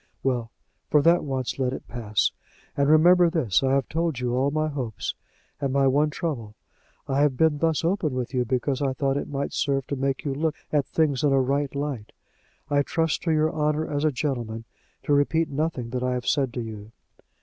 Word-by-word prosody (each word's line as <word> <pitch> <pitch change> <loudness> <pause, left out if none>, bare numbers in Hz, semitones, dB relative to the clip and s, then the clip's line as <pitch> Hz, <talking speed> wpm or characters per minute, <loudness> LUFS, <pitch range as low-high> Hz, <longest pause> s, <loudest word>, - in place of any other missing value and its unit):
"Well, 125 -4 0 0.4
for 150 -1 +4
that 170 +1 +4
once 130 -2 -3
let 130 -1 0
it - - -7
pass. 110 -3 0 0.4
And 140 0 +2
remember 175 +3 +6
this: 145 - +1
I 135 0 +2
have 135 -2 +1
told 160 -4 -1
you 125 -1 -1
all 130 +3 +2
my 155 +1 0
hopes, 130 -8 -4 0.5
and 140 -2 -1
my 135 0 +3
one 145 +3 +3
trouble. 135 - -4 0.5
I 135 +1 +1
have 145 -3 +2
been 155 -1 +3
thus 165 0 +1
open 165 -6 0
with 125 +1 -3
you 125 -1 +2
because 130 +3 -1
I 135 -2 +1
thought 135 0 0
it 145 - -3
might 140 0 -3
serve 135 -2 0
to 140 - -3
make 135 +1 -2
you 140 - 0
look 155 +2 -1 0.2
at 145 -2 +2
things 150 -5 +1
in 145 - +3
a 135 - +4
right 140 +1 0
light. 140 -7 -4 0.5
I 145 0 +2
trust 160 +1 0
to 165 - +2
your 155 +1 +2
honour 150 0 0
as 145 0 -2
a 155 - +3
gentleman 120 -5 -3 0.4
to 145 - +1
repeat 155 +3 +2
nothing 140 -5 -2
that 125 0 -2
I 125 0 0
have 125 - -4
said 135 -4 +1
to 125 - -2
you." 110 -1 -8
140 Hz, 210 wpm, -25 LUFS, 125-155 Hz, 0.5 s, remember